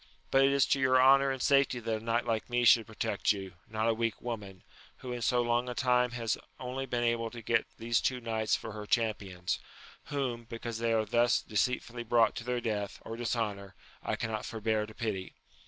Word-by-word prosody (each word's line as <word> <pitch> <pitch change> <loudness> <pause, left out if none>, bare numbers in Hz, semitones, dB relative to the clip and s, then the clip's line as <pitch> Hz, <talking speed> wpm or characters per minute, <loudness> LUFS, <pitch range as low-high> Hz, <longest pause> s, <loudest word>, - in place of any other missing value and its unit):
but 135 - +5
it 135 - +5
is 140 -1 +4
to 140 - +1
your 130 -1 +4
honour 135 +1 +6
and 135 -1 -2
safety 135 -3 +3
that 110 -1 -2
a - - -14
knight 115 +1 0
like 115 -1 -1
me 120 0 +1
should 115 -1 +6
pro 110 - -13
tect 100 - +1
you, 95 -3 -4 0.2
not 110 +1 -1
a 115 - +4
weak 115 0 -1
woman, 105 -6 -6 0.3
who 125 - -7
in 120 - -5
so 120 +1 +2
long 120 +1 +1
a 125 - -4
time 125 0 +3
has 115 -3 -2 0.2
only 130 +1 -4
been 120 -1 -1
able 115 -1 +1
to 120 - -9
get 115 - +1
these 115 0 +1
two 130 -1 0
knights 110 -2 0
for 110 - -6
her 105 0 -7
champions; 105 -6 -1 0.5
whom, 125 -5 -3
because 115 0 -6
they 115 0 +1
are 110 -1 +2
thus 120 +3 +3
deceitfully 120 +3 -1
brought 120 0 +3
to - - -5
their 125 0 -1
death, 105 -4 -3
or 115 - -5
dishonour, 105 -5 -3 0.3
I - - -1
cannot 110 -1 -3
forbear 110 -1 -1
to 110 - -13
pity. 100 -5 -4
115 Hz, 215 wpm, -31 LUFS, 110-125 Hz, 0.5 s, honour